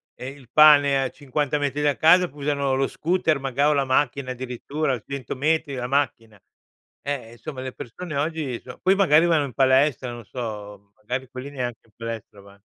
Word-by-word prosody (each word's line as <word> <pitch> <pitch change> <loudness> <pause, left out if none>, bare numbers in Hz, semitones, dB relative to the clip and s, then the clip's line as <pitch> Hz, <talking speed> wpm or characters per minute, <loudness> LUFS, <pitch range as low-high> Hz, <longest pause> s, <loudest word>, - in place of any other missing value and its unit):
ehm, 135 +3 -7
il 125 -4 -18
pane 145 -3 +6
a 130 - -2
50 145 +1 -2
metri 145 0 -1
da 145 -1 +2
casa 180 +3 +5
p - - -19
usano 140 -2 -1
lo 135 0 +1
scooter, 165 -2 0
maga 135 +2 +1
o 150 - +3
la 140 -1 +1
macchina, 130 0 0
addirittura, 130 +2 -3
100 140 -2 -5
metri, 150 +1 0
la 125 -1 -3
macchina. 115 -6 -1 0.7
Ehm, 140 -2 -2
e, - - -14
insomma, 130 +3 -8
le 130 -1 -6
persone 155 +7 -7
oggi 145 -5 -2
so 125 - -11
poi, 190 +1 +4
magari, 170 -5 +5
vanno 160 -4 +3
in 130 - -8
palestra, 130 -1 +3
non 120 -2 -9
so, 105 -4 -7
magari, 125 +4 -5
quelli 130 +1 -7
neanche 125 -4 -4
in - - -28
palestra 115 -3 -7
vann 100 0 -17
135 Hz, 195 wpm, -24 LUFS, 125-150 Hz, 0.7 s, pane